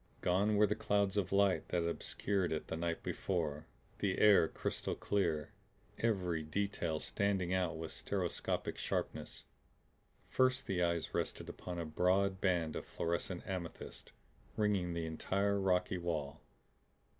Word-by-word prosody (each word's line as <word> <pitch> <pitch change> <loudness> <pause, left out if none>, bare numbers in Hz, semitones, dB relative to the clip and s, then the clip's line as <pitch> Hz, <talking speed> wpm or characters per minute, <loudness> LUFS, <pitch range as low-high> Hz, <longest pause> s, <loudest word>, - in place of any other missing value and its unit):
Gone 100 +4 +3
were 105 +1 +6
the 105 - +1
clouds 100 -2 +1
of 100 -3 0
light 100 -1 +3
that 85 -1 0
had - - 0
obscured 95 +1 -1
it 80 - -3
the - - -2
night 85 0 -2
before; 80 -5 -2 0.3
the 95 -2 +1
air 105 -6 +7
crystal - - -3
clear; 85 -7 0 0.5
every 90 -8 +1
detail 85 -1 -1
standing 95 +1 0
out 90 -3 0
with 80 0 -5
stereoscopic 95 -4 -2
sharpness. - - -3 0.8
First 130 0 +2
the 90 -2 0
eyes 85 -2 0
rested - - -2
upon 90 -1 -6
a 85 - -2
broad 95 +4 +2
band 85 -5 +1
of - - -3
fluorescent 85 +2 -2
amethyst, 90 -4 -6 0.5
ringing 100 -5 +1
the 85 -1 -1
entire 100 +5 0
rocky 90 -1 +1
wall. 80 -5 -3
90 Hz, 140 wpm, -35 LUFS, 85-100 Hz, 0.8 s, air